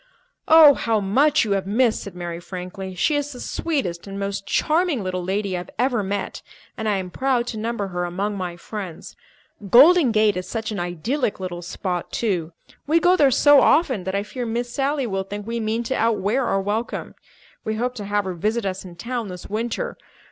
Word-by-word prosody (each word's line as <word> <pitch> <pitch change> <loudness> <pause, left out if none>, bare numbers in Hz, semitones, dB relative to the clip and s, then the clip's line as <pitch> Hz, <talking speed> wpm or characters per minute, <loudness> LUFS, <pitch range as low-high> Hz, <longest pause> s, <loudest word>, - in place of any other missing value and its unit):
"Oh, 315 -2 +9
how 225 -4 0
much 260 +8 +3
you 210 - -3
have 195 -1 0
missed!" 225 +2 +2
said 200 -3 -9
Mary 175 -1 -5
frankly. 185 +1 -7
"She 300 - +1
is 290 0 -1
the 250 - -9
sweetest 250 - -3
and 195 0 -6
most 200 0 -3
charming 315 - +1
little 185 -1 -3
lady 195 +1 -1
I - - -2
have 175 - -9
ever 245 -1 +1
met, 200 0 -3 0.3
and 220 -2 -2
I 205 - +1
am 185 -1 -5
proud 255 +2 0
to 220 - -5
number 220 -3 -2
her 175 -1 -2
among 195 +4 -2
my 180 -3 -4
friends. 185 -3 -7 0.5
Golden 290 - +7
Gate 215 -1 +3
is 180 - -4
such 225 -1 -3
an 205 - -3
idyllic 200 - -2
little 180 -2 -5
spot, 180 0 -4
too. 180 -8 -1 0.4
We 320 +3 +4
go 360 +2 +4
there 290 -6 +5
so 290 +2 +6
often 265 - +3
that 190 +1 -2
I 200 - 0
fear 245 +4 -6
Miss 240 +1 -3
Sally 275 0 0
will 195 -4 -2
think 205 +1 -7
we 230 +1 -3
mean 225 +1 -1
to 250 - -2
outwear 230 +2 +1
our 195 - +1
welcome. 210 +4 -3 0.5
We 220 - -2
hope 245 +3 -1
to 210 -5 -7
have 205 0 0
her 185 - -3
visit 215 +6 -1
us 190 0 -3
in 180 -2 -11
town 235 +4 -4
this 180 -2 -9
winter. 240 - -3
210 Hz, 205 wpm, -22 LUFS, 190-250 Hz, 0.5 s, Oh